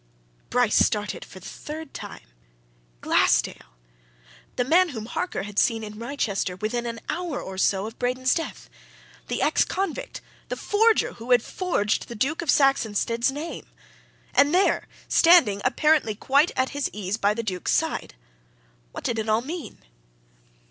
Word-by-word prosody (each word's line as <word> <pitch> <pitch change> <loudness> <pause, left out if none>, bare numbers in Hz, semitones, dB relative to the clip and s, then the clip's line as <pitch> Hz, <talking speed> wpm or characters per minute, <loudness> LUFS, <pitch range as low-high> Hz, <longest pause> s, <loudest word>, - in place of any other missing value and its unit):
Bryce 245 -2 +2
started 205 -2 -1
for 185 - -12
the 185 - -15
third 310 +1 -8
time. - - -8 0.8
Glassdale! - - +1 0.8
the 250 - +1
man 345 +7 +4
whom 225 -7 -6
Harker 245 - -3
had 205 0 -2
seen 225 -1 +2
in 210 0 -8
Wrychester 230 -7 -2
within 225 +5 -3
an 230 -1 -5
hour 345 -6 -3
or 190 - -7
so 195 0 +2
of 225 +1 -9
Braden's 255 +1 +1
death: 325 - -4 0.6
the - - -1
ex - - +3
convict, 380 -3 -4 0.3
the - - -2
forger, 440 +2 +2
who 235 +1 -10
had 245 -2 +5
forged 340 - -1
the 235 - -8
Duke 275 +10 -1
of 335 - -6
Saxonsteade's 235 -3 +2
name! 305 +4 -6 0.7
And 285 +4 +4
there! 385 +2 +2 0.2
standing, 330 - +5
apparently 265 -3 +2
quite 280 - +3
at 260 0 +2
his 285 -1 -2
ease, 205 0 -3
by 205 -1 +1
the 230 - -3
Duke's 185 -4 -2
side. - - -1 0.8
What - - -7
did 230 -1 -1
it 220 0 -3
all 215 +1 +3
mean? 320 +5 -7
245 Hz, 155 wpm, -25 LUFS, 215-305 Hz, 0.8 s, had